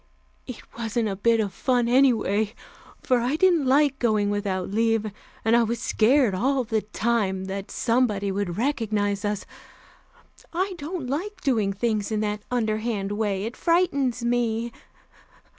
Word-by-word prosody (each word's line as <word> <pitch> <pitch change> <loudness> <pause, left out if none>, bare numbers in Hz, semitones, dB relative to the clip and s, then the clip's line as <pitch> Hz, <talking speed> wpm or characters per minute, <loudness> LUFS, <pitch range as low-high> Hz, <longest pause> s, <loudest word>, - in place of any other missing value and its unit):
It 250 - -8 0.2
wasn't 225 -1 -1
a 195 - -3
bit 230 +3 +2
of 205 -3 -1
fun, 245 0 +1
anyway, 225 -5 +2 0.5
for 250 -1 +2
I 245 +5 0
didn't 335 -4 +3
like 275 0 +3
going 215 -4 +1
without 195 -2 -2
leave, 225 0 +1 0.3
and 225 +1 +4
I 235 - +5
was 235 +1 0
scared 240 0 +3
all 260 +7 +1
the 220 -2 -1
time 205 -3 -1
that 195 +1 -5
somebody 225 -5 +1
would 190 -3 -3
recognize 215 -6 0
us. 205 -1 -2 1.1
I 375 +3 -1
don't 310 0 -5
like 365 +9 -4
doing 220 -7 +1
things 215 0 -1
in 215 - 0
that 210 0 -2
underhand 220 -4 -1
way; 205 -2 -1
it 230 +3 -5
frightens 280 -9 +1
me. 235 -1 0
225 Hz, 145 wpm, -25 LUFS, 205-255 Hz, 1.1 s, I